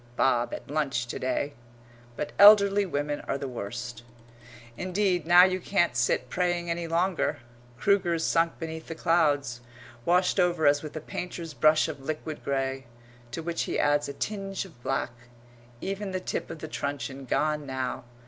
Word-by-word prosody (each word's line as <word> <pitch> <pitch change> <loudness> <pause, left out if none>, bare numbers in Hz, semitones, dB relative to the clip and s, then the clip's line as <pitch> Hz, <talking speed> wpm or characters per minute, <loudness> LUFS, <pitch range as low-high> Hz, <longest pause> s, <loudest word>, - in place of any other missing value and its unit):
"Bob 120 -2 +2
at - - -7
lunch 140 -5 -1
to 120 - -6
day" 130 +3 -1 0.6
But 145 - -4
elderly 200 -1 +8
women 145 -2 -2
are - - 0
the 140 - -4
worst. 120 0 -6 0.7
Indeed 185 - 0
now 175 +1 +9
you 185 0 +2
can't 175 -7 +1
sit 125 +1 +1
praying 175 +2 -1
any 170 0 -2
longer. 175 +2 0 0.4
Kruger's 175 -1 +2
sunk 165 0 +2
beneath 160 -1 -6
the 165 - -5
clouds 145 -7 +1 0.4
washed 180 +4 +2
over 175 -3 +2
as 145 0 +5
with 155 0 -8
a 155 - -4
painter's 170 -1 -6
brush 155 +5 +4
of 150 -3 -6
liquid 155 +2 -5
grey, 135 -1 -2 0.4
to 145 +7 -5
which 170 0 -2
he - - -1
adds 145 0 +2
a - - -5
tinge 195 0 -4
of 160 -10 -16
black 135 0 -1 0.7
even 195 0 -4
the 185 - -1
tip - - -4
of 165 - -6
the 155 - -7
truncheon 140 -2 -4
gone 150 +2 0
now. 130 -2 -3
155 Hz, 165 wpm, -27 LUFS, 135-180 Hz, 0.7 s, now